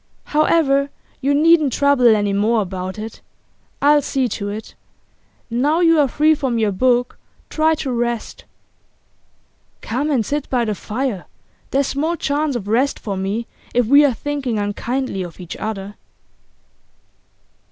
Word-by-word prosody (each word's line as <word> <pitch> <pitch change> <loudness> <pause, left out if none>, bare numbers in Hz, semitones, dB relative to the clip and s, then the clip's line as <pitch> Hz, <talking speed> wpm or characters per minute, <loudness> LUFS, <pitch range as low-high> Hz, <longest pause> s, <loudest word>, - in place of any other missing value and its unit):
'However, 295 -2 +2 0.3
you 280 +1 +1
needn't 310 -1 +4
trouble 265 -5 +4
any 205 -1 0
more 215 +2 +2
about 185 0 -6
it. 220 +1 -7 0.6
I'll 295 +1 +5
see 265 -2 0
to 205 -2 -4
it. 210 +2 -7 0.8
Now 285 +8 +1
you 330 -2 +5
are 290 - +4
free 305 +5 +3
from 265 -6 -1
your 215 -2 +1
book 245 +4 +1 0.3
try 315 0 +2
to 275 -3 -4
rest.' 240 -1 -3 1.4
'Come 270 +7 -2
and 255 -7 +1
sit 290 +3 -3
by 245 -2 +1
the 215 - -1
fire. 215 -1 -3 0.4
There's 275 +1 +1
small 310 +6 -1
chance 290 -2 -1
of 210 -5 -4
rest 250 +6 +1
for 200 -3 -5
me 195 +5 -2 0.3
if 245 -1 +3
we 280 +6 +6
are 285 - +4
thinking 275 -4 -3
unkindly 205 +2 -2
of 175 -1 -8
each 175 -2 -7
other. 205 -2 -5
250 Hz, 145 wpm, -19 LUFS, 215-285 Hz, 1.4 s, we